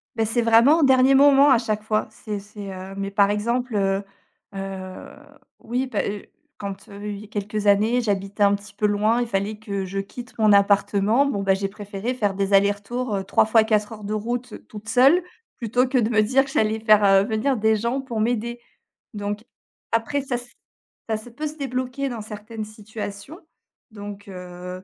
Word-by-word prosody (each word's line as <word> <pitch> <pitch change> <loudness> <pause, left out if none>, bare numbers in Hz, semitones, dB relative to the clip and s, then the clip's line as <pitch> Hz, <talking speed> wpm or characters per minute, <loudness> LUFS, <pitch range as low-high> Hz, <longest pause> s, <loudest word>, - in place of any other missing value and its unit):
Beh, 225 -1 +1
c'est 235 +2 0
vraiment 235 +8 +5
au - - +4
dernier 265 0 +5
moment 280 0 +6
à 260 - +6
chaque 215 -2 -2
fois. 215 0 0
C'est 210 -2 -6
c'est 205 -1 -9
heu 190 +1 -8
Mais 195 0 -3
par 200 0 +3
exemple, 235 +3 -1
heu 195 0 +1 0.5
heu, 190 -1 -6 0.5
oui 250 +3 -2
pas, - - -1
heu, 205 0 -5 0.3
quand, 195 -1 -7
heu, 205 +1 -8
y 205 +1 -7
a - - -13
quelques 210 0 -4
années, 215 +5 +4
j'habitais 200 -2 -1
un 200 0 +5
petit 200 0 -6
peu 210 - -1
loin, 210 +3 +2
il 240 - -1
fallait 205 +1 -2
que 200 -3 -4
je 195 +2 -6
quitte 240 +6 -7
mon 215 -2 +5
appartement, 200 +5 +3
bon 205 -8 -1
bah, 195 -1 +3
j'ai 195 0 -2
préféré 205 +3 -5
faire 205 -5 -1
des 195 0 -1
allers-retours, 205 +4 +1
heu, 195 - -2
3 200 +2 +3
fois 220 0 +5
4 215 -1 0
heures 215 -1 -9
de 210 +1 -3
route 240 +2 -3
toute 210 0 -11
seule 275 +10 +5 0.3
plutôt 245 +2 +1
que 255 - 0
de 230 -1 +2
me 215 -1 +4
dire 265 +5 +3
que 270 - -9
j'allais 220 -1 +1
faire, 215 -1 +5
heu, 195 -1 +6
venir 225 +4 0
des 220 +1 +3
gens 235 +5 -1
pour 240 -5 -4
m'aider. 235 +1 -1 0.6
Donc 205 +2 -4 0.5
après 250 +6 0
ça 265 -2 -3
s 245 0 -6 0.6
ça 220 - +1
se 220 +3 -11
peut 300 +6 -6
se 305 +1 -9
débloquer 260 0 -3
dans 230 -3 -5
certaines 215 +1 -7
situations. 215 - -8 0.5
Donc 205 -1 -9
heu, 180 0 -8
215 Hz, 200 wpm, -23 LUFS, 200-240 Hz, 0.6 s, moment